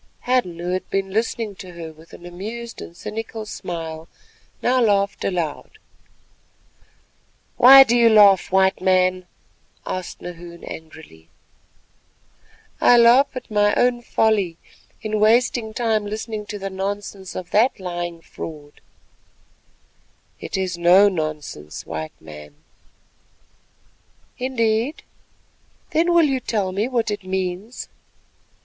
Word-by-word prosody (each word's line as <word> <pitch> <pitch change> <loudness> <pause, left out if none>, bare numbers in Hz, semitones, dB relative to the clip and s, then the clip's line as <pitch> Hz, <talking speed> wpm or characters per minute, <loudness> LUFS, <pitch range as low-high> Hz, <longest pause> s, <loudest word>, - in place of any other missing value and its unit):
Hadden, 245 -9 0
who 175 +1 -4
had 185 0 -3
been 195 0 -2
listening 220 0 -2
to 185 -3 -10
her 165 -2 -8
with 160 +2 -18
an 175 - -13
amused 220 +7 -7
and 170 - -10
cynical 220 0 -6
smile, 165 -5 -6 0.6
now 255 +1 +3
laughed 200 -3 +1
aloud. 175 - -3 1.8
"Why 270 +2 +10
do 240 -2 +1
you 235 -1 +5
laugh, 205 -5 +6
White 190 0 +3
Man?" 185 -1 +2 0.6
asked 185 -1 -5
Nahoon 170 -1 -10
angrily. 155 - -11 1.5
"I 245 - +6
laugh 240 +4 +6
at 250 -3 -8
my 205 0 +3
own 245 -1 +2
folly 210 -7 +1 0.5
in 215 -1 -1
wasting 225 +1 +2
time 220 -2 0
listening 215 0 -5
to 210 - -5
the 195 -1 -5
nonsense 195 0 -5
of 180 -1 -7
that 225 +3 +3
lying 175 -2 -5
fraud." 150 -3 -10 1.6
"It - - -5
is 185 -2 -3
no 185 +4 +6
nonsense, 155 - -5
White 80 -1 -6
Man." 75 -2 -12 1.8
"Indeed? 240 +2 -1 0.9
Then 335 +2 +2
will 340 -2 +5
you 270 -3 0
tell 205 -6 -2
me 200 +5 -1
what 235 -4 -1
it 205 - -4
means?" 190 +4 -4
195 Hz, 120 wpm, -21 LUFS, 175-225 Hz, 1.8 s, Why